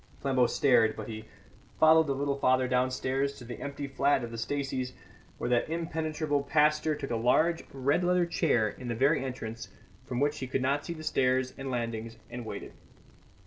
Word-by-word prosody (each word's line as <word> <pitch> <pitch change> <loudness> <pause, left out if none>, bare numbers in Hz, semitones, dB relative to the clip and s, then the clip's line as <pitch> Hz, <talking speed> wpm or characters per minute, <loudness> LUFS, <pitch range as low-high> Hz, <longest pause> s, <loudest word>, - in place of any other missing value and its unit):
Flambeau 130 -3 +2
stared; 115 -6 +3
but - - -7
he 110 -1 -7 0.5
followed 160 0 +6
the 140 - 0
little 140 0 -1
father 130 -1 +3
downstairs 130 +2 0
to - - -10
the 120 0 -8
empty 140 0 -5
flat 140 0 +1
of 115 - -5
the 115 - -6
Staceys, 130 0 -2 0.4
where - - -3
that 120 +4 +2
impenetrable 160 -3 -1
pastor 150 +2 +2
took 140 -3 -6
a - - +1
large 155 +9 +2
red 140 +6 +1
leather 180 0 +3
chair 145 -10 +2
in 125 +4 -7
the 120 - -2
very 135 +4 +3
entrance, 115 -4 -6 0.4
from 125 - -2
which 145 +2 +1
he 130 - -4
could 130 0 -1 0.2
see 170 - -4
the 155 -1 -9
stairs 130 -3 +1
and 135 0 -6
landings, 115 -2 -3
and 120 -1 -6
waited. - - -7
135 Hz, 185 wpm, -29 LUFS, 125-150 Hz, 0.5 s, followed